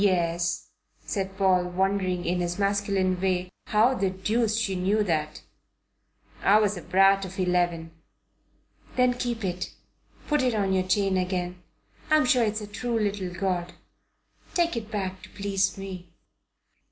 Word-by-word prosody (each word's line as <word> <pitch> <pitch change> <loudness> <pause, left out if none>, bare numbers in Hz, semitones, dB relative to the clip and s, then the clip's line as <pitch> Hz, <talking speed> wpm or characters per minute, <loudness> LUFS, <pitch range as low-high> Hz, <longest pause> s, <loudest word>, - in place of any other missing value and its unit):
"Yes," 175 -3 +1 0.4
said 195 -2 -3
Paul, 185 -2 +3
wondering, 185 0 0
in 180 +1 0
his 175 0 -2
masculine 200 -2 +1
way, 185 -1 0 0.2
how 220 +5 +4
the 195 -6 0
deuce 215 +4 0
she 225 -4 0
knew 195 +4 +2
that. 155 -5 -2 1.0
"I 205 - +5
was 210 -1 +2
a 175 - -6
brat 195 +3 +4
of 190 0 -7
eleven." 175 -2 0 1.0
"Then 250 -1 +4
keep 240 -3 -3
it. 180 0 -4 0.5
Put 295 -2 +2
it 250 -3 +1
on 195 -2 +1
your 185 -1 +1
chain 195 0 +2
again. 180 -1 -2 0.5
I'm 310 -2 +5
sure 250 -1 +4
it's 215 0 -1
a - - -5
true 230 +3 -3
little 205 -3 -1
god. 180 -1 -2 0.8
Take 340 -3 +2
it 220 -2 -4
back 190 -3 -3
to - - -12
please 195 -1 -1
me." 190 -2 -7
195 Hz, 150 wpm, -26 LUFS, 180-210 Hz, 1.0 s, I